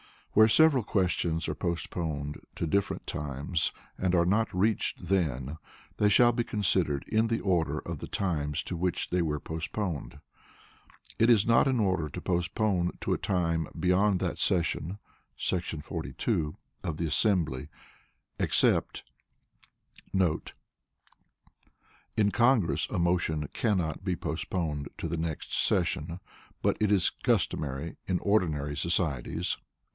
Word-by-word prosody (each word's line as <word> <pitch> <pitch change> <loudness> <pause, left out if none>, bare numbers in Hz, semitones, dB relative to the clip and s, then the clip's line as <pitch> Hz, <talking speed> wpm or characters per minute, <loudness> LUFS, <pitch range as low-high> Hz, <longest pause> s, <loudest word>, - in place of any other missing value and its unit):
Where 110 +1 +7
several 140 0 +5
questions 90 -5 0
are 75 - -1
postponed 80 -3 -3 0.2
to - - -2
different 100 +5 -1
times 75 +4 -2 0.3
and 90 -1 +1
are 85 -1 +4
not 105 +5 +2
reached 100 -1 0
then, 75 -6 0 0.4
they 105 - +4
shall 120 +4 +6
be 120 0 0
considered 90 -8 +1
in 110 +1 +2
the 115 0 -1
order 80 -6 +1
of 85 -3 -6
the - - -6
times 75 -6 -1
to 90 - -4
which 90 0 -1
they 90 0 +1
were 75 -3 -1
postponed. 80 0 -4 1.0
It 115 - +5
is 110 -4 +5
not 115 +3 +4
in 130 -2 +2
order 95 -7 +1
to - - -7
postpone 90 +1 0
to - - 0
a - - 0
time 85 -4 0
beyond 90 +3 +2
that - - -2
session 90 +1 0 0.4
[§ 85 -4 -2
42] 75 0 -2 0.3
of 85 -4 -3
the 85 - -1
assembly, 80 - +3 0.7
except* - - +2 1.1
[In 95 -4 +4 2.0
Congress 120 - +3
a - - -2
motion 85 -4 0
cannot 95 -7 -1
be 95 -2 0
postponed 80 -2 -3
to - - -4
the 85 - -2
next 80 -1 -4
session, 85 +5 0 0.4
but - - +2
it 105 -1 +2
is 95 -4 +3
customary 70 +3 0
in 90 - +1
ordinary 75 -9 +1
societies. 85 -1 0
85 Hz, 130 wpm, -29 LUFS, 80-100 Hz, 2.0 s, Where